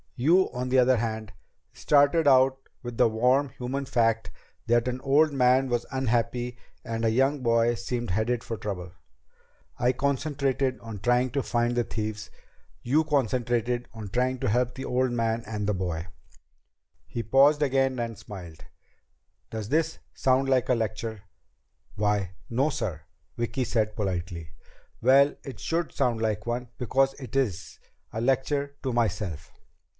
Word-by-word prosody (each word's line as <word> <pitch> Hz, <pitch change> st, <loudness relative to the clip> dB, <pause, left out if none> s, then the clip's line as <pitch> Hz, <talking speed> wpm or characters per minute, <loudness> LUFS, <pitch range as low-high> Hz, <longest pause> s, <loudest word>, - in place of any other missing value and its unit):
You, 165 Hz, +9 st, +3 dB
on 125 Hz, 0 st, -3 dB
the 130 Hz, -, +3 dB
other 130 Hz, 0 st, +5 dB
hand, 110 Hz, -2 st, -3 dB, 0.4 s
started 145 Hz, +2 st, +3 dB
out 130 Hz, -1 st, +5 dB, 0.3 s
with 120 Hz, -2 st, -6 dB
the -, -, +5 dB
warm, 125 Hz, +5 st, +2 dB
human 130 Hz, +3 st, -4 dB
fact 115 Hz, -3 st, +1 dB, 0.4 s
that 120 Hz, +1 st, +3 dB
an 125 Hz, +1 st, -3 dB
old 145 Hz, +3 st, +4 dB
man 130 Hz, 0 st, +4 dB
was 120 Hz, -1 st, -1 dB
unhappy 120 Hz, -1 st, -1 dB, 0.3 s
and 115 Hz, 0 st, -3 dB
a 115 Hz, -, +3 dB
young 135 Hz, +5 st, +2 dB
boy 115 Hz, -1 st, +3 dB
seemed 120 Hz, -2 st, -3 dB
headed 115 Hz, +5 st, 0 dB
for 115 Hz, -, -4 dB
trouble. 95 Hz, -4 st, -5 dB, 0.9 s
I 125 Hz, +1 st, +3 dB
concentrated 140 Hz, -1 st, 0 dB
on 115 Hz, -3 st, -8 dB
trying 125 Hz, +4 st, +2 dB
to 140 Hz, -, 0 dB
find 120 Hz, -1 st, 0 dB
the 120 Hz, -, +2 dB
thieves. 110 Hz, -2 st, -4 dB, 0.5 s
You 145 Hz, +6 st, +3 dB
concentrated 120 Hz, -4 st, 0 dB
on 110 Hz, -3 st, -7 dB
trying 125 Hz, +4 st, 0 dB
to -, -, 0 dB
help 125 Hz, +3 st, +1 dB
the 130 Hz, -, -6 dB
old 130 Hz, 0 st, +1 dB
man 115 Hz, -1 st, 0 dB
and 105 Hz, -2 st, -3 dB
the 105 Hz, -, +1 dB
boy." 90 Hz, -2 st, -3 dB, 1.0 s
He 115 Hz, -, -4 dB
paused 140 Hz, +6 st, +4 dB
again 135 Hz, -1 st, +1 dB
and 115 Hz, -2 st, -3 dB
smiled. 85 Hz, -6 st, -10 dB, 0.8 s
"Does 110 Hz, -2 st, -5 dB
this 160 Hz, +3 st, 0 dB
sound 135 Hz, +1 st, +2 dB
like 130 Hz, -2 st, +2 dB
a 125 Hz, -, +4 dB
lecture?" 110 Hz, -1 st, -3 dB, 0.7 s
"Why 105 Hz, -3 st, 0 dB, 0.2 s
no, 130 Hz, +6 st, +1 dB
sir," 90 Hz, -, -3 dB, 0.4 s
Vicki 120 Hz, +3 st, -1 dB
said 110 Hz, -3 st, 0 dB
politely. 90 Hz, -6 st, -3 dB, 0.5 s
"Well, 140 Hz, +2 st, +5 dB
it 135 Hz, -, -8 dB
should 165 Hz, 0 st, -1 dB
sound 115 Hz, -3 st, 0 dB
like 110 Hz, -2 st, -1 dB
one 120 Hz, +1 st, -2 dB
because 135 Hz, +2 st, +2 dB
it 135 Hz, -1 st, -9 dB
is. 100 Hz, -, -1 dB, 0.3 s
A 110 Hz, -, -2 dB
lecture 140 Hz, +3 st, 0 dB
to 130 Hz, -3 st, -1 dB
myself." 100 Hz, -9 st, -2 dB
120 Hz, 150 wpm, -27 LUFS, 110-135 Hz, 1.0 s, other